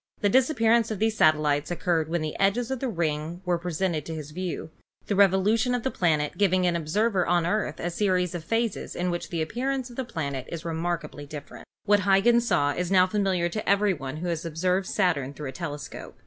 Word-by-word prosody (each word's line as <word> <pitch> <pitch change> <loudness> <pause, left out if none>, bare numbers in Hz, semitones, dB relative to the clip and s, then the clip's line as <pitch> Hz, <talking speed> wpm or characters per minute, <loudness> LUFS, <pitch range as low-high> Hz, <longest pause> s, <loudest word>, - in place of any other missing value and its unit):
The 205 - +2
disap 260 +6 +3
pearance 230 0 +3
of 215 - -3
these 220 +2 +1
satellites 150 -4 +3
occurred 170 -2 0
when 170 -1 -1
the 155 - -4
edge 195 +3 +3
of 245 +1 -2
the 265 - -2
ring 165 -1 -2
was 175 -1 +1
presented 175 -2 -1
to 165 - -4
his 150 -1 -7
view, 175 -1 -5 0.3
the 205 - -1
revolution 200 +5 +3
of 245 - -3
the 265 - -1
planet 155 -3 0
giving 185 -2 +3
to 180 - +3
an 170 - -1
observer 185 +5 +1
on 175 -1 +3
the 170 - 0
Earth 205 -7 -1
a 175 - -2
series 180 -2 +1
of 175 -2 -5
phases 225 +3 -2
in 180 0 -1
which 175 - -4
the 165 -3 -1
appearance 255 +7 -2
of 240 - -13
the 265 - -1
planet 140 - -4
is 170 0 -6
remark 170 0 -2
ably 145 -1 -10
different. 145 -1 -9 0.2
What 205 0 +4
Huygens 205 +5 +3
saw 145 -7 +2
is 175 +2 -2
now 185 -1 +5
familiar 185 -3 0
to 215 +4 -4
every 200 0 +3
one 135 -2 -6
who 175 +3 -4
has 165 -2 -2
observed 180 +4 0
Saturn 145 -9 0
through 145 -2 -5
a - - -8
telescope. 150 -4 -7
180 Hz, 225 wpm, -26 LUFS, 160-205 Hz, 0.3 s, now